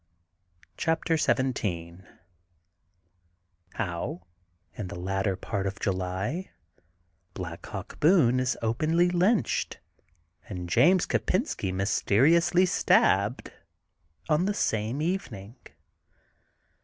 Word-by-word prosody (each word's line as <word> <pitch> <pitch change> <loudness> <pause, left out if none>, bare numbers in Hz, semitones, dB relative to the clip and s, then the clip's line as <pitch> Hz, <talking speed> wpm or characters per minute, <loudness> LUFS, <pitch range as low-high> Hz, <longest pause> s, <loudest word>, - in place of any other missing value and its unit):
CHAPTER 165 0 0
XVn 95 - -1 1.7
HOW 90 -3 -4 0.5
IN 105 - -6
THE - - -7
LATTER 95 +1 -1
PART 100 +1 -3
OF 100 +2 -5
JULT 95 - -2 0.9
BLACK 85 -2 -7
HAWK - - -8
BOONB 150 -7 +4
IS 130 0 0
OPENLY 160 +10 +2
LYNCHED 180 - +1 0.7
AND 90 -3 -5
JAMES 180 - +4
KOPENSKT 185 - -1
MYSTERIOUSLY 145 - +3
STABBED 105 - +2 0.7
ON 155 +3 +2
THE 205 - -1
SAME 115 - -1
EVENING. 125 - -4
115 Hz, 85 wpm, -27 LUFS, -, 1.7 s, BOONB